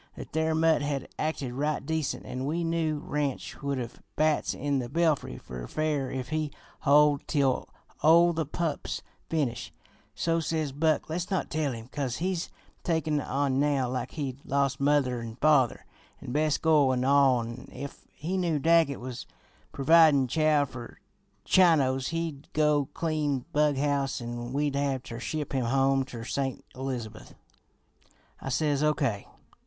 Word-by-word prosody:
That - - -9
there 160 0 +1
mutt 160 -1 +3
had 145 -2 -3
acted 145 -5 -2
right 145 +2 -1
decent, 160 -1 -2
an' 130 +1 -4
we 170 +3 -1
knew 165 -2 0
Ranch 145 -2 -3
would 140 -1 -1
have 120 -2 -6
bats 155 0 +1
in 140 0 0
the 120 -2 -4
belfry 155 - +1
fer 60 -1 -8
fair 150 -4 -1
if 130 -1 -4
he 155 -1 -1 0.4
hoid 145 0 +4
tell 135 -4 +1 0.3
o' 170 +2 +6
the 160 -3 -2
pup's 160 0 -3 0.3
finish; 135 -7 -1 0.4
so 165 0 +1
says 160 -3 -1
Buck; 155 +2 +1
'Let's 175 +3 -3
not 190 - -1
tell 155 -3 0
him, 115 -2 -7
'cause 135 -3 -3
he's 180 0 -2 0.3
takin' 160 -3 0
on 135 0 0
now 140 -4 +1
like 125 -1 -3
he'd 140 -3 -5
lost 140 0 0
mother 140 -4 +2
an' 115 -1 -7
father 140 -3 +3 0.3
an' - - -7
best 150 +2 +1
goil 150 -5 +4
an' 125 0 0
all, 135 -3 +4
an' 115 +2 -8
if 140 0 -9
he 175 +5 -3
knew 170 -4 +1
Daggett 160 -1 +3
was 125 -1 -7 0.4
providin' 150 -2 +5
chow 155 0 +3
fer 120 -3 -10 0.5
Chinos 135 -8 +4
he'd 165 -4 -4
go 150 -2 +2
clean 155 -5 -1
bug 150 -1 +3
house 140 -1 0
an' 120 0 -5
we'd 145 +1 0
have 140 -2 -1
ter 115 0 -7
ship 150 +3 -4
him 130 -3 0
home 135 +2 +2
ter 120 -3 -8
St. 135 +2 -3
Elizabeth.' 125 -5 -6 1.0
"I - - -5
says 145 +1 +1
O. 150 0 +3
K. 115 -9 -1
145 Hz, 160 wpm, -28 LUFS, 130-155 Hz, 1.0 s, o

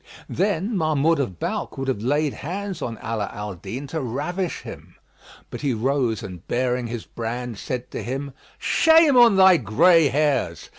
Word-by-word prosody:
'" - - -19
Then 200 +3 -1
Mahmud 155 -2 +2
of 100 -11 -2
Balkh - - -3
would 135 0 -4
have 130 -6 -1
laid 145 +4 0
hands 190 +2 -5
on 115 -4 -4
Ala 110 -3 -2
al 105 -1 -6
Din 100 +10 -7
to 160 +3 -4
ravish 150 +9 -3
him; - - -11 0.6
but - - -7
he 140 -5 0
rose 120 -2 0
and 90 -4 -9
baring 125 0 -1
his 115 -1 -6
brand, 120 -1 -5
said 125 -1 -5
to - - -5
him, 135 +3 -5 0.2
"Shame 320 -3 +4
on 240 -4 +7
thy 190 -2 +7
gray 155 - +4
hairs! 135 - 0
135 Hz, 170 wpm, -23 LUFS, 115-165 Hz, 0.6 s, on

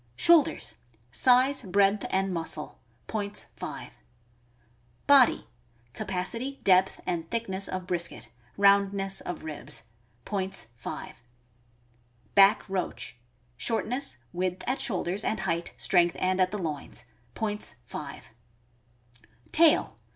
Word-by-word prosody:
Shoulders. 330 - +3 0.2
— 115 +2 -36 0.2
Size, 255 +2 +5
breadth, 200 +2 +2
and 190 0 0
muscle. 160 -2 -4 0.3
Points, 205 -2 -3
5. - - -7 1.1
Body. 275 -3 +6 0.3
— 120 0 -35
Capacity, 230 - -3
depth, 190 0 +4
and 165 -2 -3
thickness 195 -5 -2
of 185 -1 -4
brisket; 170 -1 -2 0.3
round 200 0 +5
ness 195 0 -1
of 180 - -6
ribs. 155 -6 -5 0.4
Points, 190 - -3
5. 120 - -8 1.1
Back 195 +1 +6
roach. 185 - -4 0.2
— 120 0 -38
Shortness, 245 - -1 0.2
width 185 +1 -2
at 260 - 0
shoulders, 190 -1 -1
and 215 -3 -1
height, 170 -2 -2
strength, 175 -2 +3
and 185 0 +1
at 185 - +3
the 210 - -4
loins. 150 -8 -4 0.3
Points, 210 -1 -1
5. 140 +2 -8 1.2
Tail. 325 -1 +4
190 Hz, 115 wpm, -28 LUFS, 170-210 Hz, 1.2 s, Body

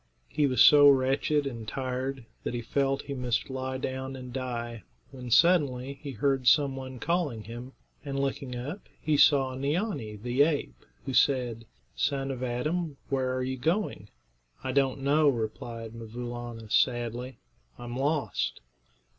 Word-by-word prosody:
He 150 -1 +2
was 130 -3 +5
so 145 -1 +9
wretched 140 +2 +2
and 115 -5 -5
tired 130 0 -3 0.2
that - - -3
he 120 - -2
felt 135 +3 0
he 140 - -5
must 125 0 -1
lie 130 0 -3
down 130 +1 -4
and 125 -1 -8
die, 120 -3 -4 0.3
when 125 -2 -8
suddenly 140 -4 +3
he 145 - -6
heard 130 +2 0
some 140 +1 +5
one 130 -1 -7
calling 150 -6 -1
him, 120 +4 -8 0.3
and 140 -1 -3
looking 135 -2 -2
up 140 +11 -5 0.2
he 155 -1 +1
saw 140 -2 +5
Neeanee, 140 - -2
the 120 +6 0
ape, 145 - 0 0.2
who 135 - -3
said, 125 -3 +2 0.3
"Son 135 - 0
of 130 -2 -5
Adam, 145 +6 -2
where 130 -2 0
are 130 - -1
you 130 +1 -2
going?" 160 - -1 0.5
"I 130 - -1
don't 135 0 +1
know," 145 +2 +4
replied 115 -1 -4
'Mvoo 115 +1 -7
Laana, 120 -2 -7
sadly; 120 +1 +1 0.4
"I'm 120 0 -7
lost." 145 +2 -1
130 Hz, 155 wpm, -28 LUFS, 120-140 Hz, 0.5 s, so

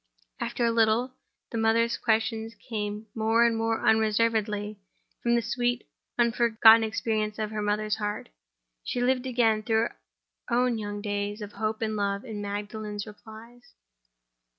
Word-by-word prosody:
After 240 - -1
a 230 - +3
little, 230 +3 +2 0.4
the 230 - -2
mother's 230 +1 +2
questions 225 0 0
came 210 -2 -5
more 225 +1 +3
and 230 -1 +2
more 225 0 -1
unreservedly 215 -1 +1 0.4
from 235 0 +2
the 235 - +1
sweet, 245 0 -1 0.3
unforgotten 230 -1 +6
experience 215 -1 -1
of 215 -1 -3
the 215 -1 -3
mother's 210 +1 0
heart. 210 -1 -4 0.5
She - - -3
lived 255 +1 +1
again 230 -4 +2
through 220 0 +1
her - - -22 0.5
own 245 -1 +2
young 205 -1 -5
days 205 0 -2
of 210 -1 -7
hope 215 +2 -2
and 215 -1 -1
love 200 +1 -1
in 215 -4 -6
Magdalen's 205 0 -5
replies. 225 +3 -13
220 Hz, 145 wpm, -27 LUFS, 210-230 Hz, 0.5 s, unforgotten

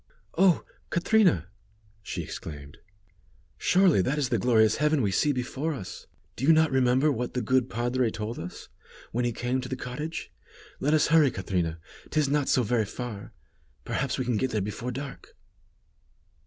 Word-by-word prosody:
"Oh! 180 -1 +4 0.2
Catrina," 175 - +3 0.5
she - - -4
exclaimed, 75 -1 -8 0.8
"surely 180 - +4
that 135 +10 0
is 140 -4 0
the 120 - +1
glorious 110 -1 +4
heaven 150 -2 +2
we 100 - +1
see 145 +9 +2
before 135 +4 -2
us. 95 -8 -8 0.3
Do - - -7
you 150 - +6
not 160 -1 +4
remember 130 +3 +3
what 125 -1 -3
the 125 - 0
good 130 +2 +2
padre 120 +1 0
told 110 +1 -5
us, 90 +2 -8 0.4
when 120 +2 0
he 120 - +1
came 125 +3 -1
to 125 - -7
the 130 - -2
cottage? 130 +6 -5 0.5
Let 150 +3 +2
us 150 - +3
hurry, 155 -3 +6
Catrina, 90 -6 -2 0.3
'tis 150 -3 +1
not 145 -1 +1
so 125 - +3
very 115 0 +1
far. 105 -1 -7 0.5
Perhaps 135 0 -1
we 130 - -2
can 120 -2 0
get 130 +4 0
there 110 -3 -1
before 105 +5 -4
dark." 135 +2 -8
125 Hz, 170 wpm, -27 LUFS, 110-145 Hz, 0.8 s, you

